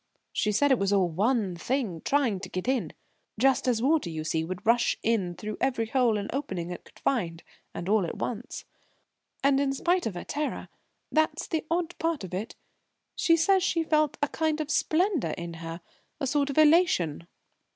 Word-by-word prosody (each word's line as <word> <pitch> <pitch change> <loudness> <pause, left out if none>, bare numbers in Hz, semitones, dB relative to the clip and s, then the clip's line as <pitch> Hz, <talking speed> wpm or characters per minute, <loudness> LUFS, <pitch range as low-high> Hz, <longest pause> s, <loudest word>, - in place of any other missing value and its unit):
She 210 - +1
said 285 +7 +3
it 260 - +4
was 195 0 +1
all 190 -3 +3
one 200 +2 +1
thing 210 - -2
trying 265 -9 +1
to 185 -1 -8
get 185 +5 -4
in; 245 - 0 0.5
just 265 +3 +3
as 235 -2 +1
water, 295 - +2
you 160 -1 -4
see, 160 0 -1
would 185 +5 -6
rush 235 +1 +3
in 200 -6 0
through 215 +2 -6
every 245 -4 +1
hole 235 -1 +2
and 200 0 -3
opening 185 -11 -3
it 175 - -7
could - - -19
find, 170 -11 -1 0.3
and 175 - -5
all 210 0 +3
at - - -6
once. 245 +2 -5 0.8
And 275 0 +4
in 280 -1 +1
spite 350 +2 +1
of 205 - -5
her 175 - -5
terror 300 0 -3 0.4
that's 315 0 +1
the 315 -1 -3
odd 345 0 -1
part 325 -7 -1
of 185 -1 -8
it 200 +5 -4 0.6
she 330 -1 +3
says 380 +4 +4
she 335 -3 +1
felt 305 -2 +1
a - - +3
kind 315 -1 0
of 305 -1 -2
splendour 315 - +1
in 170 -1 -5
her 165 +1 -6 0.4
a 280 - -1
sort 280 +1 +1
of 280 - -4
elation." 300 - +4
245 Hz, 195 wpm, -28 LUFS, 185-300 Hz, 0.8 s, it